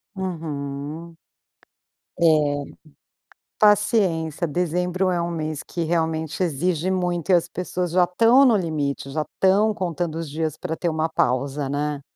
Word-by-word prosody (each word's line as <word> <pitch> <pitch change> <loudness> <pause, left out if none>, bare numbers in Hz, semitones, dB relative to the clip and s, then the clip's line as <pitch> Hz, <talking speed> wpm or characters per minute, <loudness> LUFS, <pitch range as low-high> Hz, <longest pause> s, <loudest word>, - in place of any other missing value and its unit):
Uhum. 160 -3 -5 1.0
É. 170 - +3 1.3
Paciência, 195 -6 +2
dezembro 180 +3 0
é 175 -1 0
um 170 0 -2
mês 155 -3 -4
que 170 - -5
realmente 160 0 -1
exige 175 +2 0
muito 180 -1 -1
e - - +6
as 175 -2 +3
pessoas 180 0 -3
já 180 +2 +3
tão 230 +9 +5
no 240 -4 +5
limite, 150 -7 -2
já 155 +2 -2
tão 205 +3 +4
contando 175 -3 -3
os 165 -3 -5
dias 155 0 -2
pra 160 - -4
ter 170 - -1
uma 160 0 -1
pausa, 140 0 0
né? 145 +1 -2
170 Hz, 140 wpm, -23 LUFS, 155-180 Hz, 1.3 s, e